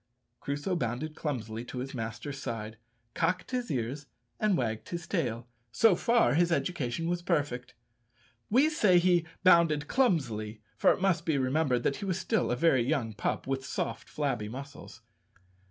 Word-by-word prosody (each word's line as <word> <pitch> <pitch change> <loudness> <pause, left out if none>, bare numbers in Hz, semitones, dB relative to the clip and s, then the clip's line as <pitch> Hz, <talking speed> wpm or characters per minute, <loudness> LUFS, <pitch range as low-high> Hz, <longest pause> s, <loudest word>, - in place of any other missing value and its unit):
Crusoe 145 +6 -2
bounded 150 +2 -3
clumsily 115 -6 -4
to 125 - -8
his 130 +2 -4
master's 120 +4 -5
side, 110 -3 -5 0.4
cocked 180 +5 -1
his 250 -1 -2
ears, 135 +3 -3 0.3
and 210 -4 +2
wagged 110 -3 -2
his 170 -1 -4
tail, 120 - -2 0.2
so 210 - +5
far 235 +6 +3
his 170 +3 +3
education 165 -3 -1
was 175 0 -1
perfect. 145 -8 -1 0.7
We 260 +8 +5
say 210 - +4
he 175 -2 +3 0.2
bounded 170 -5 +5
clumsily, 120 - 0 0.2
for - - +4
it - - -1
must 190 -3 +2
be 155 -3 +1
remembered 130 -2 +1
that 140 - 0
he 205 - -5
was 185 -2 -1
still 220 +3 0
a 120 - +1
very 135 -2 +3
young 120 -3 -1
pup, 105 - -2
with 135 0 -2
soft, 115 -3 -4
flabby 125 -8 -2
muscles. 140 +4 -9
145 Hz, 160 wpm, -30 LUFS, 120-175 Hz, 0.7 s, so